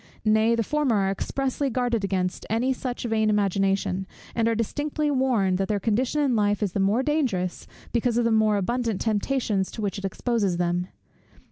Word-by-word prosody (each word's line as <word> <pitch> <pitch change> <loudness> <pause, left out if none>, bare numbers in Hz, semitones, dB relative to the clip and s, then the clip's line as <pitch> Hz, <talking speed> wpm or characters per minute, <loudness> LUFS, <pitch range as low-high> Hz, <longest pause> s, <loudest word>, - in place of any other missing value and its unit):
Nay, 220 +2 +4
the 230 - +1
former 290 -1 +1
are 195 -1 +2
expressly 270 +6 -2
guarded 240 -3 0
against 185 -1 -2
any 240 +5 +1
such 250 -1 -5
vain 220 -2 +1
imagination; 195 -2 +1 0.3
and 230 -1 +1
are 230 - +2
distinctly 290 +6 -1
warned, 235 -9 +1
that 195 - 0
their 205 0 0
condition 245 +8 0
in 270 -4 +2
life 205 -1 +1
is 200 - 0
the 200 - -2
more 205 +6 +2
dangerous, 250 - -1 0.3
because 240 0 +1
of 240 - +2
the 230 - +2
more 215 -1 +3
abundant 230 +1 -1
temptations 215 -2 0
to - - -9
which 200 0 -2
it 195 - -5
exposes 200 -2 0
them. 175 0 0
220 Hz, 180 wpm, -25 LUFS, 195-245 Hz, 0.3 s, Nay